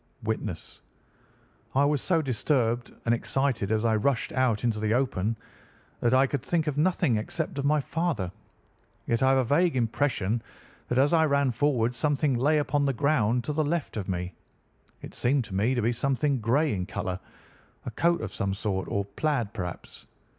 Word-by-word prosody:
"Witness: - - -4 0.9
I 140 +2 +4
was 145 -2 +1
so 165 -4 +1
disturbed 120 -2 0
and 115 - +3
excited 120 -4 -1
as 110 +1 +1
I 110 -1 +3
rushed 115 +3 0
out 125 -5 +1
into 115 -3 0
the 110 +1 +1
open, 115 -4 0 0.6
that 120 - +2
I 130 +1 +5
could 135 -1 -2
think 160 +4 0
of 150 -3 -1
nothing 150 -7 +2
except 145 +7 -3
of 140 - -1
my 150 +1 +3
father. 155 - -2 0.7
Yet 115 0 0
I 130 - +4
have 135 - +4
a 130 - +3
vague 155 +6 +2
impression 115 -3 0 0.5
that 125 - -1
as 140 +4 +4
I 160 -1 +5
ran 140 -3 +2
forward 125 -2 +1
something 145 +2 +1
lay 140 +6 +2
upon 145 -1 +1
the 135 - +1
ground 125 -4 +1
to 150 - -3
the 155 +1 +1
left 155 0 -2
of 105 -3 -4
me. 90 0 -3 0.7
It - - -8
seemed 130 +2 +1
to 100 - -10
me 110 +7 +1
to 120 - 0
be 115 - +2
something 135 +3 0
grey 140 +7 +2
in 90 -2 -3
colour, 95 -4 -3 0.7
a - - -4
coat 170 +9 +1
of - - -5
some 100 -2 -1
sort, 100 -2 -2
or 100 - 0
a 100 0 -12
plaid 135 -9 0
perhaps. 90 -5 -7
130 Hz, 190 wpm, -27 LUFS, 110-145 Hz, 0.9 s, I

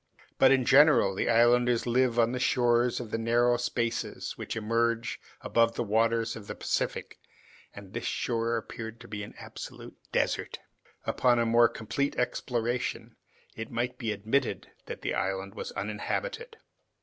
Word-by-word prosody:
But - - +7
in 135 -2 +3
general 140 -8 +6
the 95 - -1
islanders 120 +1 +4
live 120 0 +2
on 115 0 +4
the 125 - -2
shores 120 -1 +2
of 115 -3 -7
the 115 - -1
narrow 120 +2 +3
spaces 120 -1 -2
which - - -5
emerge 115 +1 0 0.2
above 115 0 +2
the - - -1
waters 115 +1 +1
of 105 -2 -10
the - - -5
Pacific, - - -2 0.6
and 100 -1 -11
this 115 - -4
shore 115 -1 -1
appeared 115 0 -7
to 120 - -11
be 105 -1 -5
an 100 - -9
absolute - - -9 0.2
desert. - - -1 0.5
Until 125 -1 +2
a 115 - +2
more 120 +1 +5
complete 115 +6 -2
exploration, 120 0 -2 0.4
it 110 0 -6
might 125 +1 -3
be 115 -4 -1
admitted 110 +6 -1 0.2
that - - -7
the - - -1
island 95 +1 -2
was - - -6
uninhabited. 450 - -4
115 Hz, 155 wpm, -29 LUFS, 115-125 Hz, 0.6 s, But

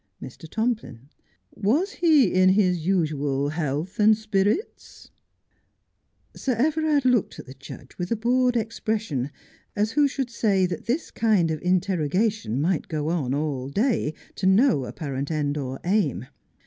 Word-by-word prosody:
Mr. 160 - -10
Tomplin: 220 - -3 0.4
"Was 285 - +1
he 310 - +3
in 185 0 +5
his 180 -4 +2
usual 145 -6 0
health 155 - -3
and 215 0 +5
spirits? 215 - -2 1.2
Sir 260 - -1
Everard 300 +3 +1
looked 250 -5 +2
at - - -9
the 130 - -11
judge 135 0 -12
with 175 - -3
a - - +3
bored 245 +2 +2
expression, 215 - -2 0.5
as 210 +1 0
who 290 +3 +3
should 265 -2 -4
say 200 -5 +2
that 180 +4 -5
this 280 +8 -1
kind 205 -8 +2
of 155 - -3
interrogation 180 - 0
might 165 +3 0
go 155 -1 -2
on 140 -6 -1
all 140 -3 -2
day, 205 - 0 0.2
to 190 - 0
no 190 - +4
apparent 140 -1 -5
end 150 -2 -1
or 135 -2 -4
aim. 170 - 0
190 Hz, 145 wpm, -24 LUFS, 150-230 Hz, 1.2 s, in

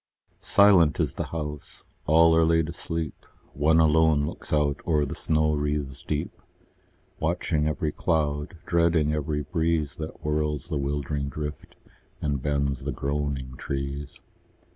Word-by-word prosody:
Silent 95 -8 +5
is - - 0
the - - -3
house: 75 -3 -6 0.2
all 80 +1 +6
are 80 - +5
laid 80 -1 +3
asleep: 85 -2 -5 0.3
One 80 +3 +3
alone 80 -2 +4
looks - - -7
out 75 -1 +1
o'er 75 -3 +2
the 70 - -5
snow 75 -1 +1
wreaths 75 -2 -2
deep, - - -4 0.8
Watching 80 -1 0
every 75 0 -1
cloud, 75 +2 -1
dreading 85 -4 +2
every 75 0 -1
breeze 80 -4 0
That 80 0 -6
whirls 75 0 -1
the 80 - -1
wildering 70 0 -2
drift, 75 0 -6 0.4
and 70 -3 -1
bends 70 -2 -1
the 70 - -2
groaning 70 -1 -3
trees. 70 +1 -5
75 Hz, 135 wpm, -26 LUFS, 70-80 Hz, 0.8 s, all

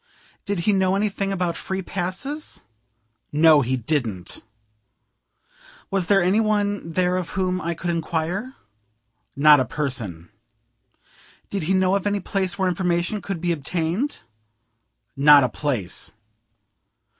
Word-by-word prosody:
"Did 200 -3 -1
he 205 +4 +2
know 190 -1 +2
anything 200 -1 -1
about 180 -3 -1
free 190 0 -4
passes?" 195 - -3 0.7
No, 155 0 +6
he 130 +1 0
didn't. 115 - -2 1.5
"Was 190 -3 0
there 195 -2 +4
any 190 +5 +3
one 205 -5 0
there 180 +1 +1
of 180 -2 -3
whom 185 -1 0
I 170 0 -2
could 175 +1 -2
inquire?" 170 +8 -2 0.8
Not 150 +1 +7
a - - +3
person. 115 - -3 1.2
"Did 200 - -2
he 190 - +3
know 185 0 +3
of 200 0 0
any 205 0 0
place 195 -1 -2
where 190 -1 +1
information 180 +2 0
could 195 -4 -4
be 175 +1 0
obtained?" 170 - -2 0.9
Not 145 0 +7
a 130 - +1
place. 115 -7 -2
180 Hz, 130 wpm, -23 LUFS, 150-195 Hz, 1.5 s, Not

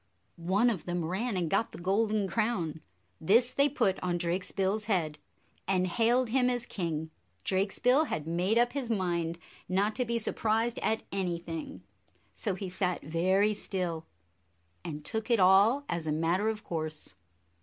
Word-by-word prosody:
One 195 +8 +2
of 185 -8 -5
them 175 -1 -2
ran 195 +5 -1
and 175 -2 0
got 195 +7 +1
the - - -10
golden 205 +3 +1
crown. 190 -8 -1 0.4
This 235 +9 +3
they 280 +1 +3
put 235 -9 +1
on 175 -1 0
Drakesbill's 190 +4 -1
head 165 -8 0 0.5
and 185 -1 +2
hailed 235 +6 +2
him 250 +1 +3
as 245 -1 -1
king. 160 -6 -3 0.3
Drakesbill 230 +10 +2
had 150 - -3
made 180 +7 +1
up 240 +1 +3
his 275 -4 -3
mind 170 -5 -1 0.3
not 200 +3 +1
to 255 - +2
be 235 0 0
surprised 225 +1 0
at 220 0 0
anything, 170 - -4 0.5
so 200 -4 -2
he 190 +1 -5
sat 180 -1 -1
very 185 +7 +2
still, 180 -5 -3 0.8
and 150 -2 -6
took 220 +1 -3
it 235 -3 +4
all 200 +9 +5
as 170 -2 -3
a - - +1
matter 170 +7 +1
of 215 -1 -4
course. 155 -2 -4
190 Hz, 155 wpm, -30 LUFS, 170-225 Hz, 0.8 s, all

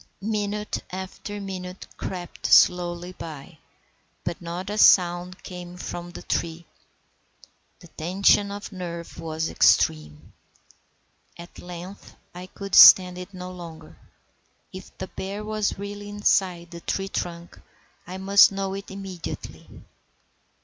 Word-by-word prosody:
Minute 210 0 -2
after 190 +2 -7
minute 185 -1 -7
crept 180 -2 -5
slowly 175 0 +4
by, 155 -3 -10 0.6
but 170 0 -4
not 175 +3 -5
a 210 - -3
sound 180 0 +4
came 180 -1 -9
from 175 -1 -6
the 175 - -10
tree. 170 0 -3 1.2
The 175 - -13
tension 190 +5 +2
of 205 +1 -7
nerve 170 -3 -7
was 160 0 -3
extreme. 75 -1 +2 1.0
At 170 +1 -12
length 180 +2 -10 0.2
I 180 +1 -9
could 195 0 -9
stand 180 -1 +9
it 180 +2 -8
no 180 -1 -8
longer. 165 -3 -10 0.8
If 185 0 -11
the - - -4
bear 195 +2 -6
was 215 -1 -1
really 205 +1 -7
inside 185 -4 +1
the 170 0 -9
tree 195 +3 -2
trunk, 170 -2 -5 0.5
I 185 +1 -6
must 200 +2 +6
know 195 -1 -3
it 195 +1 -7
immediately. 195 -3 -8
180 Hz, 120 wpm, -25 LUFS, 175-195 Hz, 1.2 s, stand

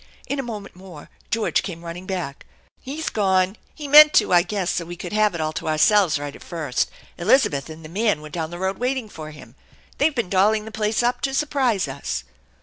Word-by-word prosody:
In 280 - -3
a - - +1
moment 215 -7 -7
more 180 -5 -12 0.2
George 220 +1 +1
came 170 -3 -7
running 175 +2 -7
back. 175 -8 -5
" - - -38
He's 315 +2 -4
gone. 190 -2 +2 0.2
He 300 -2 -7
meant 300 +1 +9
to, - - +4
I 175 - +7
guess, 195 -1 -2
so 170 - -1
we 175 +1 -7
could 175 +2 -7
have 210 -3 +2
it 165 - -3
all 155 0 -2
to - - -5
ourselves 160 +1 +4
right 145 0 -6
at - - -14
first. 155 -7 -2 0.3
Elizabeth 170 - +2
and 160 0 -10
the - - -7
man 205 0 0
were 150 0 -10
down 160 0 -4
the 175 - -7
road 190 +1 -2
waiting 250 -2 -1
for 155 -5 -8
him. 150 -1 -13 0.5
They've 290 +1 +2
been 235 -6 -1
dolling 210 +3 +2
the 220 - -8
plase 215 +1 0
up 245 +1 0
to 270 -1 -1
surprise 270 -9 +1
us." - - -4
190 Hz, 225 wpm, -22 LUFS, 165-225 Hz, 0.5 s, meant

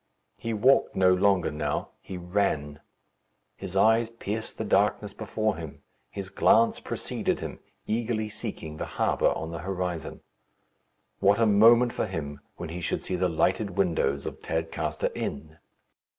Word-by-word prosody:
He 115 - -3
walked 125 +5 +3
no 95 -1 +5
longer 95 0 +2
now; 75 -1 -2
he 95 - -7
ran. 85 -5 -1 0.8
His 90 - -7
eyes 110 +3 +4
pierced 110 -1 -4
the - - -2
darkness 105 0 +1
before 110 0 -2
him. 80 -4 -9 0.3
His 95 -2 -6
glance 115 +1 +4
preceded - - -2
him, - - -6 0.3
eagerly 110 0 -1
seeking 100 -8 -6
the - - -3
harbour - - +2
on 80 - -5
the 85 - -5
horizon. 90 -3 -4 1.0
What 100 +1 +4
a 115 - +3
moment 115 +3 +6
for - - -1
him 75 -6 -5 0.2
when - - -6
he 90 +2 -5
should - - -2
see 90 - -2
the 90 0 +1
lighted 95 +4 0
windows 80 -7 +1
of - - -6
Tadcaster 80 0 -2
Inn! 75 +2 -5
95 Hz, 150 wpm, -27 LUFS, 80-110 Hz, 1.0 s, moment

